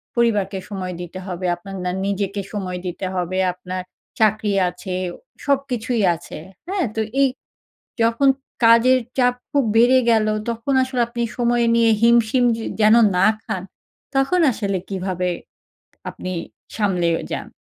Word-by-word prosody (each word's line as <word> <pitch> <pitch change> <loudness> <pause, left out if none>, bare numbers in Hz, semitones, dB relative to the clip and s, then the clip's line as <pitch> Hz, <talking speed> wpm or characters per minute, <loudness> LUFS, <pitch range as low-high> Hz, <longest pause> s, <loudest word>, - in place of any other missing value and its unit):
পরিবারকে 210 -5 +1
সময় 185 -3 -4
দিতে 175 +1 -7
হবে, 185 0 -4
আপনার 195 +3 -10
না 180 - 0
নিজেকে 200 0 -2
সময় 185 -3 -3
দিতে 180 +1 -4
হবে, 180 +1 -2 0.2
আপনার 185 0 -6 0.4
চাকরি 215 -1 +2 0.2
আছে, 185 +1 -7 0.5
সবকিছুই 255 -5 0
আছে। 165 - -10 0.3
হ্যাঁ, 380 -3 0
তো 220 - 0 0.2
এই 275 - +6 0.8
যখন 230 +5 +3 0.4
কাজের 235 +3 +6 0.2
চাপ 245 -1 +4 0.2
খুব 280 -2 +2
বেড়ে 245 +3 +6
গেলো, 215 -2 +3 0.2
তখন 235 +4 -2
আসলে 260 -1 -2
আপনি 235 0 -3
সময় 240 -1 +2
নিয়ে 230 -1 +4
হিমশিম 235 +1 +4
যে 225 - -6 0.2
যেন 215 +1 +6 0.2
না 180 - +4 0.2
খান, 205 -6 -4 0.5
তখন 270 +7 +2
আসলে 200 -4 -2
কীভাবে 185 -2 -2 0.8
আপনি 185 - -6 0.4
সামলেও 180 -6 +1
যান? - - -4
215 Hz, 135 wpm, -21 LUFS, 185-240 Hz, 0.8 s, এই